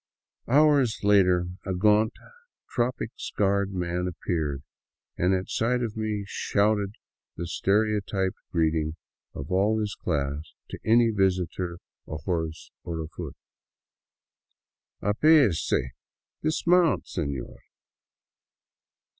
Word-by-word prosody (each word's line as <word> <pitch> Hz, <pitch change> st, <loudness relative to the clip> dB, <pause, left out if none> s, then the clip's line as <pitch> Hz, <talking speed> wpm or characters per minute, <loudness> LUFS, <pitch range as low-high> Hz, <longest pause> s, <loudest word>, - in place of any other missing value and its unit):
Hours 140 Hz, -3 st, +4 dB
later 90 Hz, -3 st, +4 dB, 0.2 s
a 95 Hz, -, -2 dB
gaunt, 105 Hz, +3 st, +3 dB, 0.6 s
tropic 120 Hz, +1 st, -1 dB
scarred 100 Hz, -1 st, 0 dB
man 90 Hz, -1 st, -2 dB
appeared, 80 Hz, -5 st, -2 dB, 0.5 s
and 90 Hz, +2 st, +2 dB
at 95 Hz, 0 st, -3 dB
sight 125 Hz, +2 st, 0 dB
of 110 Hz, -3 st, -3 dB
me 110 Hz, -2 st, -2 dB
shouted 105 Hz, 0 st, 0 dB, 0.4 s
the 85 Hz, -, -4 dB
stereotyped 100 Hz, 0 st, 0 dB
greeting 80 Hz, -2 st, +1 dB, 0.4 s
of 70 Hz, +4 st, -6 dB
all 100 Hz, +4 st, +3 dB
his 105 Hz, -1 st, -2 dB
class 75 Hz, -1 st, -3 dB, 0.2 s
to -, -, -6 dB
any 115 Hz, +1 st, +4 dB
visitor 95 Hz, -3 st, 0 dB, 0.3 s
ahorse 80 Hz, 0 st, -4 dB
or 85 Hz, -1 st, -4 dB
afoot: 80 Hz, 0 st, -6 dB, 0.9 s
" -, -, -57 dB
Apease 110 Hz, -, +4 dB, 0.4 s
— -, -, -67 dB
dismount, 170 Hz, +2 st, +3 dB
senor." 70 Hz, -7 st, -4 dB
95 Hz, 100 wpm, -26 LUFS, 85-110 Hz, 0.9 s, Hours